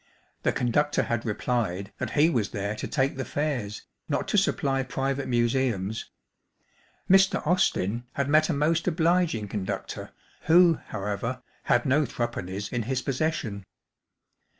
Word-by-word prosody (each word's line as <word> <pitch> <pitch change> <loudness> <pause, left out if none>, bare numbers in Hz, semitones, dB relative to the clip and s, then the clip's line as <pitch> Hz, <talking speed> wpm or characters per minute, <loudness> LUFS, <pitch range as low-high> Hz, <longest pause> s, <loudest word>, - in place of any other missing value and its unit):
The - - +2
conductor 145 +5 +1
had 120 -1 -2
replied 105 -3 -1
that - - -3
he 150 +2 +6
was 115 -8 0
there 100 +1 -3
to 110 - -5
take 135 -2 0
the 135 - -2
fares', 130 -10 -3 0.3
not - - -1
to - - 0
supply 135 -1 +1
private 135 +1 -2
museums. 120 -4 0 1.0
Mr. 190 -2 +4
Austin 120 - +1
had 140 -1 -1
met 155 +2 +4
a - - +2
most 160 +4 +1
obliging 165 - +2
conductor, 100 -2 -4 0.4
who, 170 0 +6
however, 110 +5 -3 0.2
had 120 -2 +3
no 140 +3 +3
three 120 0 -1
pennies 100 -3 -5
in 120 - 0
his 130 -1 0
possession. 130 -8 -2
130 Hz, 140 wpm, -27 LUFS, 110-150 Hz, 1.0 s, he